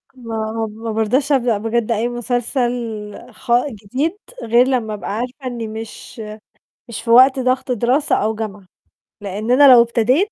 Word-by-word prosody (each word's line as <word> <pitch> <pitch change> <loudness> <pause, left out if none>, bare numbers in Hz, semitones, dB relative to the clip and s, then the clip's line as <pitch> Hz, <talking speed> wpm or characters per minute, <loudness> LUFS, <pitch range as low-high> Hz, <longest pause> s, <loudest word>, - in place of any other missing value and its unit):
ما 225 -2 -4
ما 225 +2 -6
بارضاش 235 +7 0
أبدأ 245 -5 +2
بجد 225 +2 -1
أي 225 +1 0
مسلسل 245 +1 -1 0.6
خ - - -8 0.2
جديد 255 - -3 0.3
غير 240 +3 +4
لمّا 240 -5 -1
أبقى 210 - -6
عارفة 250 +3 -6
إني 235 -3 -4
مش 225 +2 -8 0.7
مش 235 - -5
في 230 - -4
وقت 260 +3 +7
ضغط 255 0 0
دراسة 250 +5 +1
أو 220 +1 0
جامعة. 210 -3 -6 0.6
لإن 205 +3 -4
أنا 275 +2 +7
لو 240 - +8
ابتديت، 245 - +1
235 Hz, 150 wpm, -19 LUFS, 220-255 Hz, 0.7 s, لو